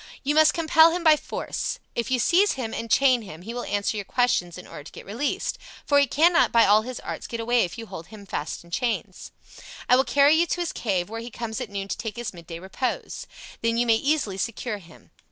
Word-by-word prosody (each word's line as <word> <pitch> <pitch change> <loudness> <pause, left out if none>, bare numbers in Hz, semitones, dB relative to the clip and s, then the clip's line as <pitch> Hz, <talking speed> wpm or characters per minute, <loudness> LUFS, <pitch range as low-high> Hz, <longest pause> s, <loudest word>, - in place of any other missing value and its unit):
You 285 +2 +1
must 310 0 +5
compel 320 0 +5
him 345 +1 -3
by 315 -2 +7
force. - - -4 0.2
If 235 -1 -2
you 260 - +2
seize 360 - +3
him 235 -4 -5
and 230 - -5
chain 255 -2 +4
him, 175 -5 -10
he 230 +4 -6
will 245 - -4
answer 205 +1 -1
your 205 - -3
questions 195 -6 0
in 180 - -10
order 145 - -10
to - - -11
get - - -11
released, 240 +8 -2 0.3
for 285 -1 +4
he 280 - +3
cannot 330 +6 +4
by 230 -1 +5
all 210 +2 +5
his 250 +2 -6
arts - - -6
get 235 - -5
away 235 0 +2
if 175 - -8
you 230 - -7
hold 165 -6 -9 0.2
fast 150 -1 -4
the 170 - -18
chains. 235 +6 -3 0.6
I 250 - +6
will 260 - +4
carry 285 +2 +4
you 335 +2 +3
to 355 - -2
his 345 - -2
cave, 185 -6 -1
where 225 +1 -6
he 235 - -7
comes 230 +1 -5
at 245 - -5
noon 200 -1 -4
to - - -4
take 220 -2 -5
his 240 -3 -5
midday 170 -1 -9
repose. 190 +8 -4 0.3
Then 230 0 +1
you 240 - +2
may 230 -1 +4
easily 275 -8 0
secure 230 0 -3
him. 165 -3 -18
235 Hz, 240 wpm, -25 LUFS, 200-280 Hz, 0.6 s, by